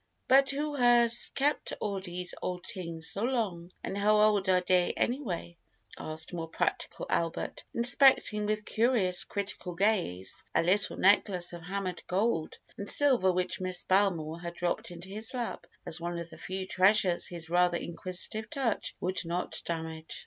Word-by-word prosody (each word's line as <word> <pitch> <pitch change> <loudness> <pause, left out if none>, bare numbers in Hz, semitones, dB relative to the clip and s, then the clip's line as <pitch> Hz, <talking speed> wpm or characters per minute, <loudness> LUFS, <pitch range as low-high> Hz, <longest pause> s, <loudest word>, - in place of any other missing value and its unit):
"But 270 +1 +5
who 295 +2 -1
has 240 -2 +5
kept 285 0 0
all 200 -2 -2
dese 180 -1 -3
old 180 -1 -4
tings 170 -5 -4
so 200 - +2
long, 215 -9 -2
and - - -4
how 210 +1 +3
old 210 -2 +3
are 185 -1 +5
dey 180 0 +2
anyway?" 200 - -2 0.4
asked 160 +2 -5
more 165 -2 -4
practical 160 - -2
Albert, 165 -1 -2
inspecting 235 -3 +5
with 215 0 -2
curious, 220 -6 +2
critical 200 -3 -4
gaze 180 - 0
a - - +3
little 190 +4 +1
necklace 185 -3 +2
of 170 - -8
hammered 185 0 -4
gold 185 -4 -1 0.2
and 200 - -5
silver 255 -10 +3
which 180 +1 -2
Miss 185 -1 +1
Belmore 175 -5 +1
had 170 0 -6
dropped 175 0 -2
into 175 +1 -10
his 220 +6 -3
lap 240 -2 -4 0.2
as 165 +1 -1
one 175 0 -3
of 170 0 -7
the - - -11
few 190 0 -4
treasures 190 -1 +3
his 170 -2 -6
rather 175 0 +3
inquisitive 185 +6 -3
touch 255 -4 -2
would 185 +1 -2
not 175 +1 -4
damage. 160 -1 -5
185 Hz, 160 wpm, -30 LUFS, 175-215 Hz, 0.4 s, But